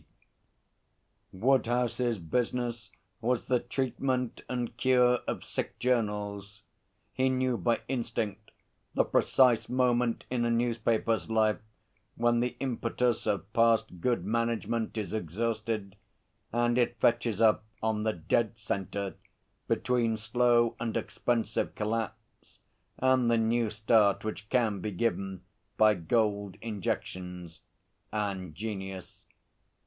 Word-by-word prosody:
P. - - -13
Woodhouse's 120 0 +2
business 120 +5 -2 0.3
was 120 +1 0
the 125 -1 +2
treatment 130 -1 -2
and 120 -2 -3
cure 125 0 +4
of - - -3
sick - - -4
journals. 105 -4 -1 0.5
He 130 0 +2
knew 130 -1 +1
by 120 0 +1
instinct 115 -5 -3 0.5
the - - +4
precise 120 -4 +3
moment 125 -2 +1
in 125 -2 +1
a 120 - +1
newspaper's 115 -3 +1
life 110 -1 +2 0.6
when 120 0 +2
the 125 +1 -1
impetus 125 -2 -1
of 100 0 -1
past 115 -5 +3
good 120 -6 +1
management 115 +1 -1
is 105 -1 -3
exhausted 110 +1 -2 0.6
and 120 +1 +2
it 120 -1 +1
fetches 115 -2 +2
up 110 -1 +4 0.2
on 110 -1 +1
the 110 0 +1
dead 110 +6 0
centre 100 -2 -3 0.5
between 115 -3 +1
slow 120 +1 +2
and 115 -2 -1
expensive 120 -2 -1
collapse 110 0 -4 0.4
and 130 -2 +3
the 115 - +4
new 115 0 +2
start 105 -1 +3
which 105 -1 -5
can 115 -6 +1
be 105 - -3
given 95 -2 -2 0.3
by 110 0 +6
gold 100 +2 0
injections 90 -5 -4 0.5
and 95 -6 -3
genius. 95 -2 -6
115 Hz, 115 wpm, -30 LUFS, 105-120 Hz, 0.6 s, by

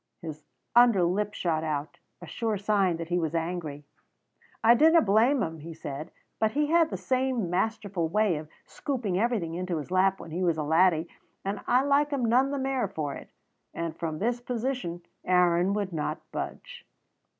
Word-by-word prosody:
His 155 -2 -8 0.3
under 240 -6 +6
lip 205 +4 0
shot 160 -3 -1
out, 150 -1 -3 0.2
a - - -6
sure 220 +4 -2
sign 195 -4 +1
that 165 0 -6
he 175 0 +1
was 160 -1 -2
angry. 165 -3 -3 0.8
"I 230 +1 +8
dinna 320 +7 +6
blame 230 +4 +3
him," 160 0 -4
he 165 +2 -9
said, 145 +1 -6 0.3
"but 220 0 +1
he 295 +1 +1
had 335 -1 +4
the - - -4
same 255 -7 -1
masterful 195 -2 -1
way 210 -2 +2
of 155 0 -8 0.2
scooping 230 -10 -2
everything 210 -8 0
into 180 0 -2
his 155 +3 -6
lap 190 +1 +3
when 170 -1 -10
he 175 +3 -3
was 170 -3 +2
a 155 - -1
laddie, 165 +1 +3 0.4
and 195 +1 -2
I 250 +2 +4
like 285 +1 +3
him 275 -4 -1
none 250 +4 +3
the 280 - -2
mair 265 -1 0
for 145 -3 -4
it"; - - -10 0.5
and 165 -1 -3
from 160 -2 -4
this 240 +6 -1
position 240 -8 -3 0.2
Aaron 180 0 +3
would 200 -3 -2
not 155 -1 -2
budge. - - -6
185 Hz, 185 wpm, -28 LUFS, 165-240 Hz, 0.8 s, I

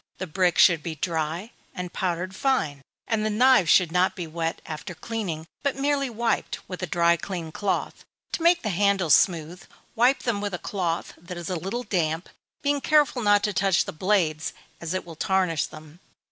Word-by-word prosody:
The 185 - -4
brick 175 0 +1
should 165 -4 +6
be 160 0 -5
dry, 165 - -2 0.2
and 180 -1 -5
powdered 185 +1 -2
fine, 160 - 0 0.3
and 220 -2 0
the 215 - +1
knives 235 -4 +4
should 180 -4 +5
not 180 +2 +2
be 180 - -4
wet 165 +1 -3
after 160 +3 -7
cleaning, 180 -5 -4 0.2
but 280 -2 0
merely 275 0 0
wiped, 235 0 -1
with 180 -1 -7
a 185 - -2
dry 170 +1 +3
clean 170 -3 -5
cloth. 200 +4 -2 0.3
To - - -3
make 345 +1 +4
the 215 - -1
handles 195 -4 +3
smooth, 170 +1 +2 0.3
wipe 245 +4 +3
them 225 -4 -1
with 205 -3 -2
a - - -3
cloth 175 -3 -3
that 175 +2 -8
is 175 +2 -5
a - - 0
little 195 +9 -3
damp, 165 -5 -1 0.3
being 285 0 +1
careful 295 -4 +3
not 205 -1 +4
to 210 -1 0
touch 190 -1 +2
the - - -5
blades, 165 -3 0 0.3
as 170 +2 -4
it 185 - -3
will 165 -2 -10
tarnish 180 -2 +1
them. 155 +2 -13
185 Hz, 190 wpm, -25 LUFS, 165-215 Hz, 0.3 s, should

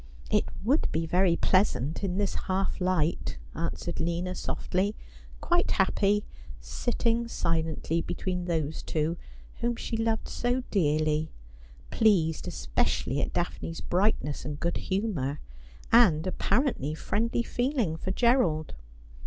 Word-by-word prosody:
It - - +3 0.2
would 270 +9 +2
be 165 +1 0
very 175 +1 +3
pleasant 175 - +1
in 185 -2 -1
this 200 -1 0
half 190 0 0
light,' 180 -3 0 0.2
answered 170 +1 -3
Lina 170 +2 -1
softly, 190 +3 -1 0.5
quite 350 0 +2
happy, 200 +2 +2 0.3
sitting 235 -1 -1
silently 165 -4 -1
between 180 0 -3
those 160 -3 -1
two 160 +1 -1 0.4
whom 240 0 0
she 230 - -4
loved 225 0 0
so 245 +1 -1
dearly, 155 -3 +2 0.6
pleased 175 -8 +3
especially 130 - 0
at - - -2
Daphne's 170 -1 -2
brightness 180 -6 0
and 145 0 -5
good 170 +1 -1
humour, 180 -9 -1 0.5
and 190 -9 +6
apparently 190 - 0
friendly 230 +7 0
feeling 245 - 0
for 165 - -5
Gerald. 190 - +2
180 Hz, 120 wpm, -28 LUFS, 160-220 Hz, 0.6 s, and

